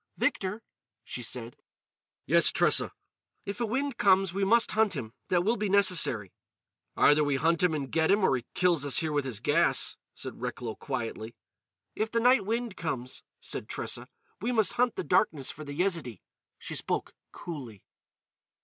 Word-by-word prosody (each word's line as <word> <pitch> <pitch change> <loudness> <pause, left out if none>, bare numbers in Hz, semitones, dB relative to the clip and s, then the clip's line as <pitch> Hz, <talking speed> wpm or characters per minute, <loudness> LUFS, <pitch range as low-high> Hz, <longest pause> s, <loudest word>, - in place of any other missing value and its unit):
"Victor," 205 +4 -1 0.4
she 125 - -6
said. 120 0 -5 0.7
"Yes, - - +5
Tressa." - - +2 0.5
"If 200 +4 -5
a 235 - +1
wind 270 +3 -2
comes, 190 -2 +4
we 195 +1 -1
must 230 +4 +4
hunt 215 -4 +2
him. 115 -6 -5
That 175 -1 +2
will 225 +5 +1
be 210 -1 -1
necessary." 180 - +2 0.6
"Either 150 +1 +5
we 145 -1 +1
hunt 165 +4 +2
him 180 -3 +3
and 140 -3 -4
get 160 0 +2
him, 200 +1 +3
or 135 - +4
he 125 - -4
kills 175 -5 +2
us 140 -2 +1
here 160 -2 +1
with 145 -2 0
his 120 -6 -3
gas," - - +2 0.2
said - - -7
Recklow 125 -2 -4
quietly. 115 -4 -5 0.6
"If 220 +1 -2
the 230 - 0
night 245 -4 +4
wind 230 -2 -2
comes," 130 -6 -4 0.2
said - - -5
Tressa, - - -4 0.3
"we 235 +4 -1
must 220 -4 +2
hunt 245 -1 +1
the - - -3
darkness 145 -10 +1
for 155 - -10
the 145 -1 -7
Yezidee." 165 - -1 0.3
She - - -7
spoke - - -2 0.2
coolly. 130 - -8
170 Hz, 170 wpm, -29 LUFS, 130-210 Hz, 0.7 s, Yes